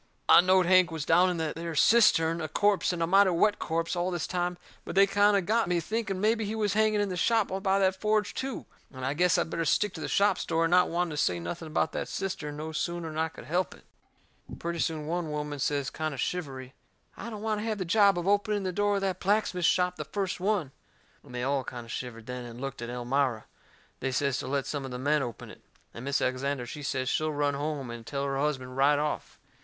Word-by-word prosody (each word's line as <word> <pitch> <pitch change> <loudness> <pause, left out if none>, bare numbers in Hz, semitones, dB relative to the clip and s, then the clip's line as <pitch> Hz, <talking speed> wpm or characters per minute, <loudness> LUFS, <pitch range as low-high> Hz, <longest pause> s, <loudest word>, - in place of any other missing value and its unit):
I - - +8
knowed 185 0 +4
Hank 185 0 +5
was 160 -3 -4
down 175 +3 +4
in 180 - -2
that 160 -2 -2
there 165 0 -5
cistern, 165 -5 +4
a 155 - -2
corpse 200 +6 +2
and 170 -2 -2
a - - +3
mighty 195 +3 +5
wet 205 +4 +2
corpse, 165 +2 -1
all 175 +1 0
this 175 -4 -2
time; 180 -1 -2 0.3
but - - -7
they 195 +1 +7
kind 205 +1 +3
o' - - +2
got 220 +4 +1
me 180 - +1
to 170 - +1
thinking 210 0 -2
mebby 220 +2 +2
he 210 +1 -3
was 210 -2 0
hanging 215 0 +3
out - - +3
in 205 - -2
the 185 - -3
shop 225 +4 +2
by 195 0 +2
the 190 -1 +3
forge, 210 +2 0
too. 265 -2 -4 0.3
And 130 -1 -6
I 135 - 0
guessed 180 +3 +3
I'd - - -1
better 165 - -1
stick 185 +6 +1
to 160 - -7
the - - -3
shop 200 -2 +2
story, 165 0 +1
not 180 +1 +4
wanting 175 0 -1
to 150 - -5
say 90 - +1
nothing 85 - -6
about 155 - 0
that - - -3
cistern 150 -6 -4
no 155 +1 -5
sooner'n 165 0 -3
I 160 +1 0
could 160 - -12
help 175 +6 -1
it. - - -20 0.7
Pretty 170 0 -4
soon 155 -2 -1
one 170 0 -2
woman 150 -1 -4
says, 140 0 -1
kind 155 -2 -3
o' - - -10
shivery: 135 -5 -4 0.4
"I 235 - -7
don't 215 -2 -7
want 215 -1 0
to - - -4
have 220 -2 -1
the 185 - -3
job 200 +1 +4
of 175 +1 -3
opening 205 0 +1
the 185 - -1
door 205 +2 +1
of 200 - -1
that 190 -2 -1
blacksmith 195 -3 +1
shop 180 +1 +2
the 150 - -5
first 190 +5 -3
one!" 185 -7 0 0.5
And 125 - -12
they 125 - -2
all 135 0 0
kind 120 -2 -7
o' - - -15
shivered 115 -1 -6
then, 125 0 -6
and 120 0 -9
looked 135 -2 -5
at 120 - -5
Elmira. 125 -1 -1 0.5
They 135 - -2
says 140 0 0
to - - -5
let 140 0 -1
some 145 -2 -3
of 135 - -6
the 125 - -5
men 145 +3 +1
open 120 -4 -6
it. - - -15 0.3
And 115 - -8
Mis' 140 +1 0
Alexander, 130 0 -1
she 145 +5 -7
says 130 -2 -2
she'll 155 +4 0
run 145 -1 0
home 140 -3 -3
and 120 -1 -8
tell 140 +4 -3
her 135 -1 -1
husband 130 -3 -2
right 140 +2 +4
off. 150 +1 -3
165 Hz, 250 wpm, -28 LUFS, 140-195 Hz, 0.7 s, I